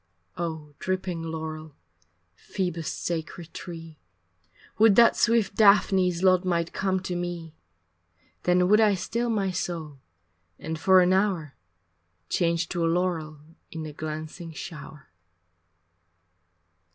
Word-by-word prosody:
Oh 160 -3 -5
dripping 185 -2 -2
laurel, 160 -2 -6 0.6
Phoebus 165 - -4
sacred 170 0 -5
tree, 165 -3 -9 0.8
Would 220 -2 +6
that 235 +1 +6
swift 230 -3 +2
Daphne's 190 -4 +4
lot 185 -1 +5
might 170 -2 -1
come 190 -1 0
to 180 -1 -4
me, 175 -2 -5 0.9
Then 180 0 +3
would 210 +3 +5
I 210 -2 +4
still 235 +6 -2
my 200 -4 0
soul 165 -5 -4 0.6
and 160 +1 -5
for 185 +2 +6
an 180 +1 +3
hour 185 -7 0 0.8
Change 170 -1 +1
to 175 -2 -2
a 165 - +2
laurel 165 -4 -1 0.3
in 160 -1 -6
the 155 -1 -7
glancing 155 +2 -6
shower. 155 -3 -9
175 Hz, 115 wpm, -26 LUFS, 160-190 Hz, 0.9 s, Would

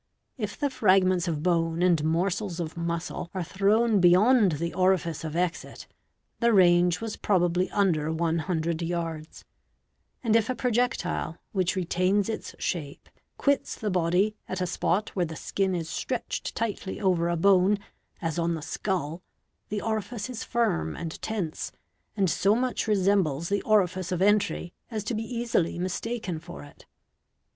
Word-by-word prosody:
If 210 -6 -4
the 285 -2 0
fragments 185 -5 +3
of 155 -3 -2
bone 165 -1 +1
and 170 -4 +3
morsels 175 +3 0
of 165 -1 -4
muscle 170 0 -3
are 185 - -1
thrown 205 +5 +2
beyond 190 +3 +5
the 170 +3 -3
orifice 185 -3 +1
of 160 -1 -5
exit, 175 0 -2 0.5
the 235 -1 +3
range 175 -2 +4
was 225 -2 -4
probably 180 -2 +1
under 160 -6 +1
100 165 0 -1
yards; 165 -2 -4 0.8
and 225 -2 +2
if 225 0 +3
a 255 - 0
projectile, 235 -9 -1
which 185 -1 0
retains 185 +3 +1
its 220 - -5
shape, 150 -6 -4 0.3
quits 280 -1 +1
the 210 -2 -3
body 180 +4 +2
at 185 - -3
a 180 - 0
spot 180 +3 0
where 180 -3 -1
the 160 - -7
skin 190 +3 -1
is 165 -2 -3
stretched 180 +9 -3
tightly 210 -4 -3
over 180 -4 +2
a 170 - 0
bone, 195 +3 +4 0.5
as 165 0 -1
on 170 0 +1
the 155 - -6
skull, 165 -1 -3 0.5
the 210 0 -3
orifice 220 +2 -3
is 230 - -5
firm 80 - 0
and 165 -1 -6
tense, 195 -8 -3 0.5
and 195 -2 +3
so 195 +5 +3
much 250 -1 -1
resembles 190 -7 +2
the 200 0 +1
orifice 185 -3 +1
of 180 - -1
f 190 - +4
entry 205 -4 +1 0.2
as 220 -4 -3
to 235 - -3
be 220 - -1
easily 230 -7 -1
mistaken 185 0 -3
for 175 0 -10
it. 145 - -16
185 Hz, 155 wpm, -27 LUFS, 170-210 Hz, 0.8 s, beyond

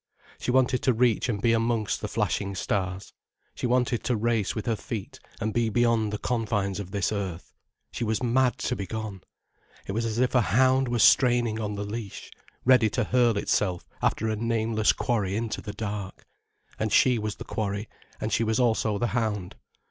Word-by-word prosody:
She - - -4
wanted 130 0 +3
to 130 - +3
reach 120 +1 +2
and 105 -4 -1
be 115 +3 +3
amongst 115 -2 0
the 105 - -2
flashing 100 -1 -1
stars, 95 -3 -2 0.4
she - - -3
wanted 125 -1 +1
to 125 - +1
race 115 -2 0
with 110 - -4
her 115 - +1
feet 105 -1 -6 0.2
and 110 0 -2
be 120 -1 +1
beyond 115 -1 +2
the 105 - -2
confines 105 -5 -1
of 100 -3 -6
this 100 0 -1
earth. 95 -5 -4 0.4
She - - -4
was 110 +2 -1
mad 125 +1 +2
to 125 - -2
be 100 -4 -5
gone. 110 -2 -5 0.6
It - - -4
was 115 +3 -1
as 110 0 -3
if 125 +1 +2
a 125 - +5
hound 130 +4 +3
were 120 0 0
straining 120 -2 +4
on 105 -1 -3
the 100 - -3
leash, 105 -1 -6 0.3
ready 125 -4 +5
to 125 +4 0
hurl 120 -1 +2
itself 95 -3 0
after 110 - +1
a 110 - 0
nameless 110 -1 +1
quarry 100 -5 -1
into 115 0 -3
the 105 - -6
dark. 100 -3 -5 0.5
And 110 -1 -1
she 125 -3 +4
was 105 -1 -3
the - - -8
quarry, 100 0 -3 0.3
and 110 - -2
she - - +2
was 110 +1 0
also 110 -3 +2
the 120 - 0
hound. 105 -6 -1
110 Hz, 195 wpm, -26 LUFS, 105-120 Hz, 0.6 s, a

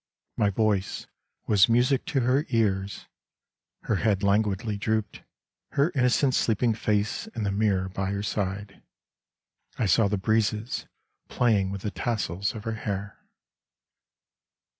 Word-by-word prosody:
My 105 - +2
voice 100 -1 0 0.4
was 100 0 +5
music 125 +3 +3
to 150 -7 0
her 130 +5 +1
ears, 100 -4 0 0.8
Her 110 - 0
head 105 -1 +1
languidly 105 +1 +1
drooped, 110 0 -2 0.5
Her 145 +5 +2
innocent 130 0 +2
sleeping 115 0 +2
face 105 - -1
in 110 - -2
the 100 - 0
mirror 100 -2 +1
by 95 +1 -3
her 100 0 -2
side: 100 -1 -3 1.0
I 115 - 0
saw 100 +3 +4
the 105 +1 0
breezes 110 +3 0 0.4
playing 105 -6 +2
with 100 0 -5
the 105 - -2
tassels 100 -4 -2
of 105 - -7
her 115 -1 -3
hair. 100 -1 -4
105 Hz, 130 wpm, -26 LUFS, 100-115 Hz, 1.0 s, was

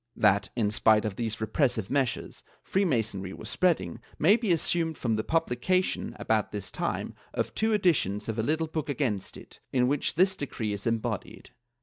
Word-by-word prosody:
That, 100 -1 +3
in 110 -4 +1
spite 110 0 +4
of 105 -3 -2
these 115 0 -3
repressive 110 -2 0
measures, 135 -4 -1 0.2
Free 195 +1 +1
Masonry 105 - -1
was - - -6
spreading, 180 -3 +1 0.2
may 185 +8 +6
be 225 -5 0
assumed 165 -1 +1
from 115 -3 0
the 110 - -1
publication, 165 +5 0
about - - 0
this - - -5
time, - - -2 0.2
of - - -1
two 220 +1 +1
editions 165 - +2
of 110 0 -2
a - - +3
little 155 +7 0
book 155 -1 -4
against 120 -9 -2
it, - - -14
in 125 -1 +3
which 145 +1 0
this 190 +3 +4
decree 115 - -3
is 100 +3 -4
embodied.' 115 -1 -3
125 Hz, 180 wpm, -28 LUFS, 110-165 Hz, 0.2 s, may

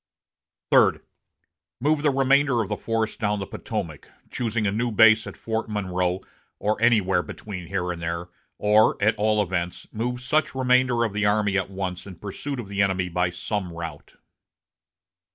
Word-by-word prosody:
"Third. - - +4 0.8
Move 150 +3 +2
the 150 - +3
remainder 135 -1 +3
of 100 - -8
the - - -1
force 115 -1 -2
down 105 -1 -1
the 100 - -4
Potomac, - - -5 0.2
choosing 115 -2 -1
a 100 - +2
new 115 +3 -1
base 110 0 +6
at - - -8
Fort 110 0 -3
Monroe, 90 -3 -1 0.4
or 105 +1 -1
anywhere 105 -6 +3
between 90 -2 -8
here 90 -2 -2
and 85 -1 -6
there; 85 +1 -3 0.3
or, 105 +1 +4
at 110 +2 +3
all 105 0 +2
events, 90 -2 -3
move 125 +3 -2
such 135 +4 0
remainder 125 -2 +3
of 110 -3 -1
the 105 0 +1
army 105 -1 +2
at 95 -1 0
once 95 -1 -5
in 95 - -9
pursuit 105 - -5
of 115 - -6
the 100 0 -1
enemy 95 -2 +1
by 90 +1 +1
some 90 +1 -4
route." 85 -3 -8
105 Hz, 170 wpm, -24 LUFS, 95-115 Hz, 0.8 s, base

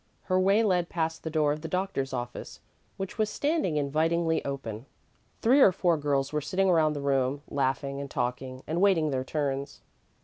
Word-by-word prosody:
Her 185 -1 +1
way 195 +4 +4
led 180 -5 +1
past 160 -1 -2
the 160 - -4
door 155 -2 +2
of 150 - -7
the 165 - -5
doctor's 180 -6 -2
office, 120 0 -6 0.4
which 195 +3 -6
was 215 -1 +2
standing 290 - 0
invitingly 160 +3 +1
open. 130 -4 -5 0.6
Three 260 +5 +5
or 195 - +8
four 175 -1 +2
girls 145 -2 -1
were 150 - 0
sitting 185 +6 +1
around 155 -3 +3
the 145 - -4
room, 140 0 0
laughing 140 0 -1
and 140 - -6
talking 130 +1 -3
and 165 +4 -1
waiting 170 -7 +3
their 130 -1 -1
turns. 140 0 -3
150 Hz, 180 wpm, -28 LUFS, 140-180 Hz, 0.6 s, or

